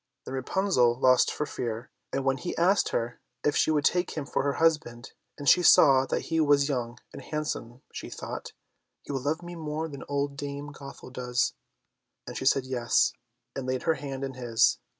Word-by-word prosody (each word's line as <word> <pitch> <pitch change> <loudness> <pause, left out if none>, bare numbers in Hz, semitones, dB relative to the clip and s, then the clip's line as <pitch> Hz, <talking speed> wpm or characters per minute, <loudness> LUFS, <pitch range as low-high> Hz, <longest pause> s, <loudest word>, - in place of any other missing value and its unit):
Then - - -6
Rapunzel 130 -3 +2
lost 130 -1 +4
her 150 - 0
fear, 115 -3 -5 0.2
and 135 0 -2
when 135 -1 +2
he 175 - -5
asked 185 +4 +3
her 120 +1 -2 0.2
if 145 - +2
she - - +3
would 150 -2 +2
take 180 -2 +1
him 150 - -2
for - - -1
her 140 0 0
husband, 150 -7 0 0.3
and 145 - -6
she 180 - +7
saw 135 -5 +6
that - - -1
he 165 - -1
was 145 -2 +4
young 120 -4 -2 0.2
and - - -8
handsome, 135 -5 -4
she - - -6
thought, - - -7 0.5
"He - - -7
will 135 -2 -2
love 155 +5 -1
me 175 0 -7
more 155 0 -3
than 140 -3 -9
old 140 0 -1
Dame 145 0 -5
Gothel 140 -2 -11
does;" 125 0 0 0.7
and - - -8
she - - -4
said 135 -1 +3
yes, 125 -2 +2 0.4
and 130 -1 -4
laid 130 0 -1
her 160 - +3
hand 135 -3 -6
in 135 -1 -3
his. 120 -3 +2
140 Hz, 195 wpm, -28 LUFS, 130-150 Hz, 0.7 s, she